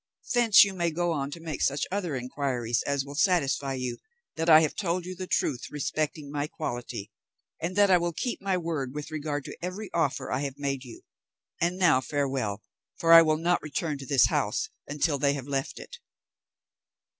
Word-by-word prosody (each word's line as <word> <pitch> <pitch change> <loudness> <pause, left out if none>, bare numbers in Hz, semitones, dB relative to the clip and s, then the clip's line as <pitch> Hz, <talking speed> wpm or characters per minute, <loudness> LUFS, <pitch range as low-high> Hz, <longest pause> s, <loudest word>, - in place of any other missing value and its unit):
Thence 235 -4 +7
you 200 -1 -2
may 170 -2 0
go 175 +2 -1
on 140 -3 -2
to 155 - -8
make 160 -3 -5
such 140 +1 +1
other 185 -7 -2
inquiries 125 -2 -1
as 140 -1 0
will 140 - -8
satisfy 145 -5 +1
you 125 -2 -4 0.4
that 165 +1 -1
I 155 0 +9
have 155 - 0
told 175 -2 -2
you 185 +1 -6
the 185 0 -6
truth 125 -7 -1
respecting 150 0 -3
my 145 0 -2
quality, 120 -9 -5 0.5
and 175 +3 -3
that 205 -1 +5
I 180 - +6
will 175 0 -1
keep 240 +9 -3
my 195 -1 0
word 155 -6 -3
with 150 +1 -6
regard 150 -2 -3
to - - -8
every 190 +4 -5
offer 140 -5 0
I - - 0
have 140 -1 -4
made 140 -2 -2
you. 120 -3 -12 0.6
And 175 +2 +1
now 165 -8 +4
farewell, 130 -8 -2 0.3
for 165 0 +4
I 165 - +11
will 155 -1 +2
not 175 +2 +1
return 150 0 -3
to 135 - -9
this 135 -1 +5
house 435 - 0 0.2
until 145 0 0
they 140 +1 +3
have 140 -2 -6
left 135 -1 -3
it." 485 - -11
150 Hz, 195 wpm, -27 LUFS, 135-175 Hz, 0.6 s, I